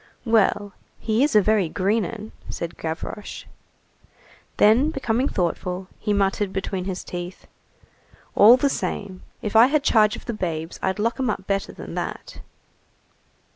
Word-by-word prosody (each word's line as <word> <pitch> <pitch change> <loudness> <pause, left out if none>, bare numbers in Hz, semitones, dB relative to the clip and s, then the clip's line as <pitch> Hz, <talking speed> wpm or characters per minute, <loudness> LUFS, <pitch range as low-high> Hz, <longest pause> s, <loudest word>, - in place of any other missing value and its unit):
"Well, 205 -3 +2 0.3
he 225 +3 +1
is 290 -5 +1
a 210 - +6
very 210 -5 +2
green 200 +5 +1
'un," 215 +3 -7 0.2
said 170 0 -5
Gavroche. 165 +5 -6 1.1
Then, 235 +8 +5
becoming 260 -3 0
thoughtful, 180 - -2
he 210 - -2
muttered 200 0 +1
between 190 -1 -3
his 190 -2 -4
teeth:— 175 +1 -7 0.9
"All 225 +5 +8
the 280 - +2
same, 200 -8 -3 0.2
if 210 0 -3
I 230 +3 +8
had 290 +1 +1
charge 215 -4 +4
of - - -11
the 235 - -3
babes 165 -5 -4
I'd 190 +1 -1
lock 230 +5 -1
'em 260 -3 0
up 195 -3 -3
better 195 0 -1
than - - -9
that." - - -5
205 Hz, 150 wpm, -23 LUFS, 185-225 Hz, 1.1 s, All